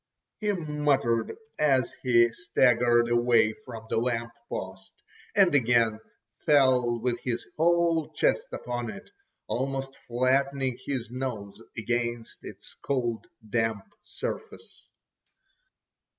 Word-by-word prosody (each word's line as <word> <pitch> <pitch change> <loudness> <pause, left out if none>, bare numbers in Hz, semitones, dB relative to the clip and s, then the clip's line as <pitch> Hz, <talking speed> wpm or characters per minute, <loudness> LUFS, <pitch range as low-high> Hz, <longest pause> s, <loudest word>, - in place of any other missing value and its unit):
he 210 -1 +1
muttered 150 - 0 0.2
as 135 -4 +2
he 120 -2 +5
staggered 120 -7 +3
away 120 -2 +3
from 115 -4 -9
the 110 - 0
lamp 115 -1 -1 0.2
post, 95 0 -6 0.4
and 195 -5 +5
again 115 -5 +3 0.4
fell 130 -5 +4
with 120 +1 -1
his 120 -2 -3
whole 170 -1 +2
chest - - +1
upon 120 -1 -4
it, 195 - -10 0.3
almost 135 +1 -2 0.2
flattening 130 +1 +1
his 125 -4 -3
nose 115 -5 -5 0.2
against 120 0 -2
its - - -11
cold 120 -5 -1 0.2
damp 115 -2 -1
surface. 445 - -7
125 Hz, 105 wpm, -27 LUFS, 115-140 Hz, 0.4 s, he